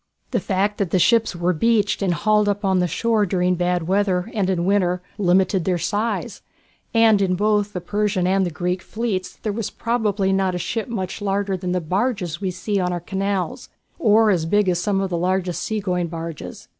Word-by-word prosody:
The - - +1
fact 200 +1 -1
that 190 -2 +1
ships 225 +3 +3
were 175 +1 +1
beached 210 +4 +1
and 185 -3 +1
hauled 210 +1 +2
up 205 0 -1
the 190 -2 +2
shore 220 +5 +1
during 180 0 +1
bad 175 -1 0
weather, 190 +1 +1
and 200 -4 0
in 175 -2 0
winter, 180 -2 +1 0.2
limited 185 -1 +2
their 180 0 +1
size, 205 +7 -2 0.5
and 225 -3 +4
in 185 -2 +2
both 210 +1 +1
the 180 - -4
Persian 205 0 0
and 190 +1 +2
the 180 - 0
Greek 180 +3 -2
fleets 215 -4 -3
there 215 - -1 0.2
probably 215 -4 0
was 190 - +2
not 190 -2 0
a - - -1
ship 220 +5 -3
much 195 -6 -4
bigger 200 -1 -1
than 180 -1 -4
the 180 0 0
barges 185 -1 -1
we 190 - -1
see 200 +3 -2
on 180 -1 0
our 175 - -2
canals, 195 0 -3 0.3
or 220 -6 +4
as 165 -4 0
big 205 +3 +2
as 175 -1 0
some 195 0 0
of 195 -1 -2
the 170 - 0
largest 180 0 -1
sea 220 -1 -2
going 180 -3 -1
barges. 165 -1 -7
190 Hz, 200 wpm, -22 LUFS, 180-210 Hz, 0.5 s, and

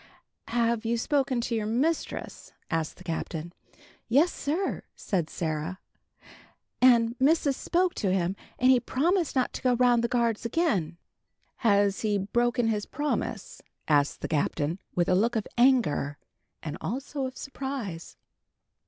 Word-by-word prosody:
"Have 235 -1 +1
you 235 +1 0
spoken 265 -1 +1
to 235 - -3
your 215 -2 -1
mistress?" 280 +9 -2 0.2
asked 165 -2 -1
the - - -13
Captain. 165 0 -4 0.6
"Yes, 290 +9 +4
sir," 330 +7 -2
said 175 -6 -2
Sarah. 160 +2 -3 1.0
"And 235 -2 +5
missis 285 0 +3
spoke 360 +4 +1
to 195 -4 0
him, 185 0 0 0.2
and 255 +1 +5
he 255 - +5
promised 330 +8 0
not 255 -1 +1
to - - -5
go 250 -1 +3
round 240 -1 +4
the - - +2
guards 235 -2 0
again." 225 - 0 0.6
"Has 200 -3 +3
he 210 -2 +1
broken 240 +4 +1
his 210 -2 -1
promise?" 295 +2 -3 0.3
asked 145 -2 +2
the - - -2
Captain, 155 +2 -1 0.2
with 175 0 +2
a 185 - +3
look 225 +6 +2
of 220 - 0
anger, 235 - +3 0.5
and 155 -1 -5
also 265 +4 -3
of 260 - -10
surprise. 265 - -6
235 Hz, 145 wpm, -27 LUFS, 185-260 Hz, 1.0 s, And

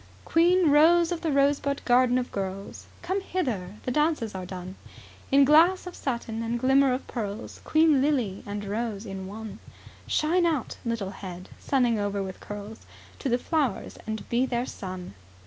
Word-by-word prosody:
"Queen 345 -1 +4
rose 335 +3 +5
of 345 - -2
the 325 - 0
rosebud 280 0 +2
garden 250 0 +4
of 250 -1 -2
girls 195 0 -5 0.2
Come 375 +3 -1
hither, 225 - -3
the 250 - -2
dances 300 -6 +1
are 185 -1 -6
done, 185 0 -7 0.6
In 275 0 +6
glass 330 +7 +5
of 360 - -7
satin 235 -4 -3
and 230 +1 -1
glimmer 270 +2 +4
of 255 +2 -2
pearls. 215 -2 -5
Queen 310 -3 +4
lily 255 -10 0
and 205 0 -4
rose 215 0 -3
in 195 -2 -6
one; 215 +2 -8 0.5
Shine 340 +3 +2
out, 305 -7 -2
little 230 -5 -2
head, 185 -2 -9
sunning 245 -5 +1
over 205 -1 -1
with 190 -1 -7
curls 205 +1 -8 0.4
To 275 - -2
the 240 - +3
flowers, 275 - -1
and 220 0 -4
be 245 +2 +1
their 240 -1 -1
sun." 185 - -7
245 Hz, 165 wpm, -27 LUFS, 205-295 Hz, 0.6 s, In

